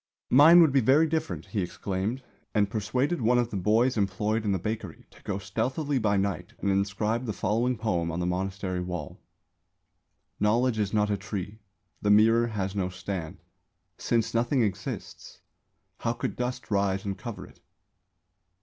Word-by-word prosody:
"Mine 160 Hz, +6 st, +8 dB
would 160 Hz, -4 st, +5 dB
be 135 Hz, -, +4 dB
very 135 Hz, +7 st, +5 dB
different," 125 Hz, -, -2 dB
he 105 Hz, -, -2 dB
exclaimed, 100 Hz, +7 st, -3 dB, 0.3 s
and 100 Hz, -1 st, +2 dB
persuaded 125 Hz, -, -1 dB
one 120 Hz, +2 st, +3 dB
of 120 Hz, -1 st, 0 dB
the -, -, -4 dB
boys 110 Hz, +7 st, +2 dB
employed 105 Hz, +2 st, 0 dB
in 105 Hz, -, +1 dB
the 95 Hz, -, +1 dB
bakery 105 Hz, -2 st, -5 dB
to -, -, -19 dB
go 100 Hz, -, -3 dB
stealthily 130 Hz, +9 st, -1 dB
by 105 Hz, -3 st, +1 dB
night 95 Hz, -3 st, -2 dB
and 100 Hz, -, 0 dB
inscribe 105 Hz, +5 st, 0 dB
the 110 Hz, -, -2 dB
following 120 Hz, +6 st, 0 dB
poem 90 Hz, -7 st, -1 dB
on 85 Hz, -, -3 dB
the 90 Hz, -, -1 dB
monastery 95 Hz, +1 st, -2 dB
wall: 90 Hz, -4 st, -6 dB, 1.2 s
_Knowledge 115 Hz, +2 st, +2 dB
is 100 Hz, -2 st, 0 dB
not 105 Hz, -1 st, +1 dB
a 100 Hz, -, +1 dB
tree; 100 Hz, 0 st, -6 dB, 0.4 s
The 105 Hz, -, 0 dB
Mirror 115 Hz, +3 st, +5 dB
has 100 Hz, -3 st, -3 dB
no 95 Hz, -2 st, -1 dB
stand; 90 Hz, -3 st, -6 dB, 0.6 s
Since 115 Hz, -2 st, 0 dB
nothing 120 Hz, +2 st, +2 dB
exists, 95 Hz, -3 st, -5 dB, 0.6 s
How -, -, 0 dB
could -, -, -4 dB
dust 125 Hz, -1 st, -4 dB
rise 100 Hz, -1 st, +1 dB
and 100 Hz, -1 st, -2 dB
cover 105 Hz, +3 st, -7 dB
it? -, -, -18 dB
105 Hz, 165 wpm, -27 LUFS, 95-120 Hz, 1.2 s, Mine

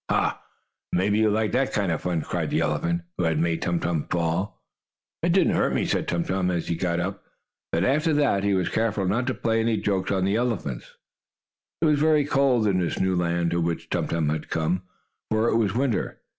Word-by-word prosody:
"Ha! -, -, +1 dB, 0.5 s
Maybe 100 Hz, +4 st, +2 dB
you 110 Hz, -1 st, +4 dB
like 110 Hz, +1 st, +1 dB
that 130 Hz, +1 st, +1 dB
kind 100 Hz, -4 st, +1 dB
of 80 Hz, -, -2 dB
fun!" 85 Hz, -3 st, -1 dB
cried -, -, -2 dB
the -, -, +1 dB
elephant 85 Hz, 0 st, 0 dB, 0.2 s
who 90 Hz, -, +2 dB
had 80 Hz, -1 st, +1 dB
made 80 Hz, +1 st, 0 dB
Tum 85 Hz, -1 st, 0 dB
Tum 85 Hz, -3 st, -2 dB
fall. 85 Hz, +3 st, -1 dB, 0.6 s
"It -, -, +2 dB
didn't -, -, +3 dB
hurt -, -, +1 dB
me!" -, -, +1 dB
said -, -, -1 dB
Tum 85 Hz, 0 st, 0 dB
Tum, 95 Hz, 0 st, 0 dB
as 85 Hz, -2 st, -2 dB
he 85 Hz, -, +1 dB
got 85 Hz, 0 st, -1 dB
up. 95 Hz, +3 st, -4 dB, 0.5 s
But, 85 Hz, -, +1 dB
after 150 Hz, -, +2 dB
that, 140 Hz, -10 st, +2 dB
he 100 Hz, -1 st, +2 dB
was 90 Hz, -2 st, 0 dB
careful 110 Hz, -3 st, 0 dB
not 115 Hz, +7 st, 0 dB
to 130 Hz, -, 0 dB
play 115 Hz, 0 st, 0 dB
any 115 Hz, 0 st, +1 dB
jokes 95 Hz, -3 st, -1 dB
on 95 Hz, -1 st, +1 dB
this 100 Hz, +2 st, +1 dB
elephant. 100 Hz, -, -2 dB, 1.0 s
It -, -, +3 dB
was 150 Hz, -2 st, +3 dB
very 155 Hz, -1 st, +3 dB
cold 135 Hz, -5 st, +2 dB
in 95 Hz, -3 st, +2 dB
this 85 Hz, -3 st, -1 dB
new 95 Hz, 0 st, +1 dB
land 85 Hz, -1 st, 0 dB
to 85 Hz, 0 st, 0 dB
which 85 Hz, 0 st, -3 dB
Tum -, -, 0 dB
Tum 80 Hz, -3 st, 0 dB
had 75 Hz, 0 st, -3 dB
come, 80 Hz, +3 st, 0 dB, 0.5 s
for 110 Hz, +1 st, +2 dB
it -, -, +1 dB
was 110 Hz, -3 st, +1 dB
winter. 130 Hz, -3 st, 0 dB
95 Hz, 220 wpm, -25 LUFS, 85-115 Hz, 1.0 s, you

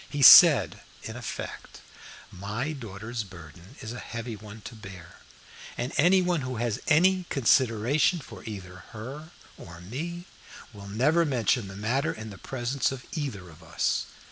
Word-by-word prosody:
He 145 Hz, -1 st, -1 dB
said -, -, +9 dB, 0.2 s
in 110 Hz, -, -7 dB
effect: 120 Hz, -2 st, -7 dB, 0.5 s
"My 105 Hz, +10 st, -4 dB
daughter's 115 Hz, -2 st, -6 dB
burden 90 Hz, -1 st, -14 dB
is 110 Hz, +1 st, -6 dB
a 125 Hz, -, -7 dB
heavy 115 Hz, 0 st, -6 dB
one 105 Hz, +1 st, -11 dB
to 115 Hz, -, -9 dB
bear, 95 Hz, -5 st, -12 dB, 0.6 s
and 120 Hz, +2 st, -3 dB
any 180 Hz, +4 st, +4 dB
one 175 Hz, -3 st, 0 dB
who 130 Hz, 0 st, -4 dB
has 120 Hz, 0 st, -2 dB
any 180 Hz, +4 st, +4 dB
consideration 130 Hz, -, +2 dB
for 150 Hz, -, -11 dB
either 95 Hz, -5 st, -8 dB, 0.2 s
her 135 Hz, +9 st, -8 dB, 0.3 s
or 85 Hz, -1 st, -11 dB
me 165 Hz, -, -6 dB, 0.5 s
will 100 Hz, -1 st, -11 dB
never 140 Hz, +12 st, +2 dB
mention 125 Hz, -6 st, 0 dB
the 95 Hz, -, -9 dB
matter 130 Hz, +10 st, -1 dB
in 110 Hz, -8 st, -8 dB
the 100 Hz, -, -11 dB
presence 130 Hz, +1 st, -2 dB
of 130 Hz, -2 st, -8 dB
either 130 Hz, -, -5 dB
of 80 Hz, 0 st, -15 dB
us. 80 Hz, -, -1 dB
115 Hz, 155 wpm, -27 LUFS, 100-140 Hz, 0.6 s, said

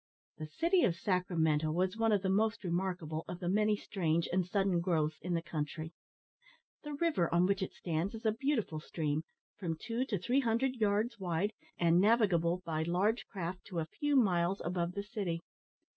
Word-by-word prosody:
The 155 Hz, -, -4 dB
city 335 Hz, -, +2 dB
of 170 Hz, -, +3 dB
Sacramento 165 Hz, -5 st, +1 dB
was 185 Hz, +4 st, 0 dB
one 225 Hz, 0 st, +2 dB
of 205 Hz, -2 st, +2 dB
the 190 Hz, -, +1 dB
most 220 Hz, +3 st, +1 dB
remarkable 175 Hz, -3 st, -2 dB
of 180 Hz, -, -6 dB
the 175 Hz, -, -4 dB
many 210 Hz, +3 st, +3 dB
strange 170 Hz, -5 st, 0 dB
and 185 Hz, 0 st, +3 dB
sudden 190 Hz, 0 st, +1 dB
growths 160 Hz, -4 st, 0 dB
in 175 Hz, +1 st, -1 dB
the 165 Hz, -, -1 dB
country. 160 Hz, 0 st, -4 dB, 0.9 s
The 295 Hz, -1 st, -5 dB
river 290 Hz, -, +1 dB
on 175 Hz, +2 st, +4 dB
which 195 Hz, +1 st, +1 dB
it 190 Hz, -, -2 dB
stands 175 Hz, +5 st, -2 dB
is 225 Hz, -, -9 dB
a 220 Hz, -, +4 dB
beautiful 225 Hz, -, -1 dB
stream, 155 Hz, -1 st, -2 dB, 0.4 s
from 165 Hz, -5 st, -2 dB
two 235 Hz, +6 st, -2 dB
to 220 Hz, -6 st, -1 dB
three 245 Hz, +10 st, +1 dB
hundred 255 Hz, +1 st, +1 dB
yards 215 Hz, +2 st, +1 dB
wide, 185 Hz, +3 st, -1 dB, 0.2 s
and 170 Hz, +1 st, +4 dB
navigable 185 Hz, -5 st, +3 dB
by 160 Hz, -2 st, -1 dB
large 185 Hz, +8 st, +1 dB
craft 180 Hz, -2 st, -5 dB
to 185 Hz, -, -7 dB
a 160 Hz, -, 0 dB
few 290 Hz, -, -1 dB
miles 190 Hz, -6 st, +3 dB
above 175 Hz, 0 st, -1 dB
the 200 Hz, -, -3 dB
city. 200 Hz, -6 st, -3 dB
185 Hz, 185 wpm, -33 LUFS, 170-215 Hz, 0.9 s, on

